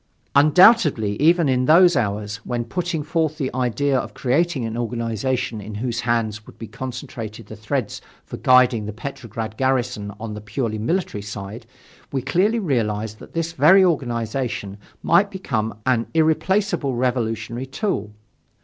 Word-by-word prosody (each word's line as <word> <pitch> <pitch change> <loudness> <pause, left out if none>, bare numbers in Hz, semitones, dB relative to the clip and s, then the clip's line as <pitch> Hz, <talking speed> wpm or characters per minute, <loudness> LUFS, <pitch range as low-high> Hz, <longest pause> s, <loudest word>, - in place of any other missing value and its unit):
Undoubtedly, 150 - +5
even 165 +1 +4
in 125 -1 +2
those 175 +4 +6
hours, 105 -3 -1
when 120 +2 -4
putting 170 +3 -2
forth 155 -1 -1
the 135 -4 -2
idea 130 +3 0
of 130 - -2
creating 140 0 0
an 115 0 -4
organization 120 0 -2
in 105 +1 -8
whose 120 +2 -2
hands 110 -3 -1
would - - -14
be 115 - -7
concentrated 115 -3 -7
the 110 - -10
threads 110 +3 -3 0.2
for - - -7
guiding 125 -4 +4
the 105 - -5
Petrograd 115 -2 -6
garrison 125 -6 0
on 110 -1 -5
the 105 - -7
purely 110 +1 -3
military 140 - -1
side, 105 +3 -8 0.4
we 135 - -1
clearly 185 - +2
realized 110 - -1
that - - -13
this 165 0 -2
very 185 +5 +6
organization 120 - -2 0.2
might 200 0 +4
become 115 - -3
an 125 -3 +1
irreplaceable 160 -2 +1
revolutionary 120 0 -2
tool. 135 - -2
125 Hz, 145 wpm, -22 LUFS, 110-150 Hz, 0.4 s, those